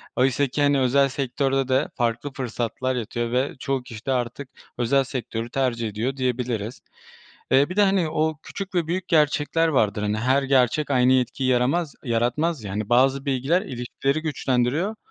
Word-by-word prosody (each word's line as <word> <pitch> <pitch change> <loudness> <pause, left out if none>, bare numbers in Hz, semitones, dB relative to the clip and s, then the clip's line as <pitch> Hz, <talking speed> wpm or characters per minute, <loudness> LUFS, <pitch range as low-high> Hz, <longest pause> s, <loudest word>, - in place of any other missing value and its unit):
Oysaki, 135 +2 +1
hani, 145 -1 +3
özel 135 +2 +3
sektörde 135 0 -1
de 130 0 +1
farklı 120 +3 -1
fırsatlar 130 +1 -3
yatıyor 120 0 -3
ve 130 +3 0
çoğu 135 -1 -2
kişi 115 -3 -10
de 135 - 0
artık 125 +2 -2 0.3
özel 125 +3 +2
sektörü 120 -3 -5
tercih 120 -3 -1
ediyor 115 +6 -3
diyebiliriz. 125 -3 -2 0.7
Eee, 135 +3 +4
bir 180 - -5
de, 205 - +5
hani, 190 -4 +2
o 155 0 0
küçük 195 -1 -7
ve 170 -3 +1
büyük 180 +2 -2
gerçekler 155 +1 +2
vardır. 105 -9 +1
Hani, 105 0 -1
her 130 +5 +2
gerçek 135 +2 +2
aynı 130 -1 +4
etkiyi 130 +1 0
yaramaz 135 +6 +1
yaratmaz 125 +5 0
ya. 100 - -5
Hani, 105 +2 -3
bazı 135 +3 +3
bilgiler 140 +6 +1
ilişkileri 135 +3 -2
güçlendiriyor, 145 - 0
130 Hz, 165 wpm, -24 LUFS, 120-145 Hz, 0.7 s, de